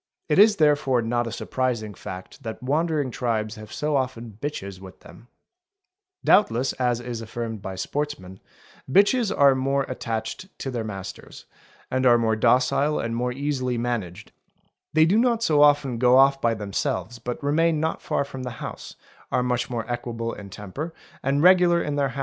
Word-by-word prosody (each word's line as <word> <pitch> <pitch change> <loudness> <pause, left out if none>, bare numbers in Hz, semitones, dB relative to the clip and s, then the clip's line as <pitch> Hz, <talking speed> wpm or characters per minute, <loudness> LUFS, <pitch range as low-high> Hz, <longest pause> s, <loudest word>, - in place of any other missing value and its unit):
It 150 - +3
is 210 +1 +7
therefore 145 -7 +2
not 120 +1 0
a - - -4
surprising 115 -3 -2
fact 95 -1 -9
that 110 +2 -7
wandering 150 0 0
tribes 110 -3 -1
have 110 0 -11
so 150 +5 -1
often 120 -5 -3
bitches 100 -10 -5
with 95 -1 -13
them; 120 - -15 1.0
doubtless 130 - +3
as 125 -2 0
is 120 -1 -5
affirmed 115 -1 -5
by 95 0 -6
sportsman, 95 -3 -4 0.5
bitches 205 - +4
are 140 -7 +5
more 135 +1 0
attached 115 +6 -4
to 135 - -4
their 120 -3 -3
masters, 95 -3 -8 0.5
and 130 0 +2
are 120 -1 +6
more 110 -1 +1
docile 130 +6 +2
and 115 0 -2
more 125 +1 -1
easily 130 -2 -2
managed; 110 -5 -4 0.6
they 155 0 +5
do 195 +7 +3
not 235 -1 +2
so 150 -6 +3
often 145 -5 +4
go 125 +1 +5
off 135 0 +5
by 115 -1 +2
themselves 105 +3 -3
but 125 +3 -5
remain 160 +2 +2
not 160 +1 -2
far - - -1
_ - - -9
from 130 -2 -7
the 125 -2 -6
house, - - -8 0.4
are 125 - +1
much 125 0 -1
more 120 -2 -3
equable 120 -1 -3
in 100 -1 -9
temper 105 - -7 0.3
and 140 +2 +1
regular 180 -1 +6
in 145 -3 -2
their 140 -1 +1
i. 135 +2 -7
125 Hz, 175 wpm, -24 LUFS, 115-145 Hz, 1.0 s, is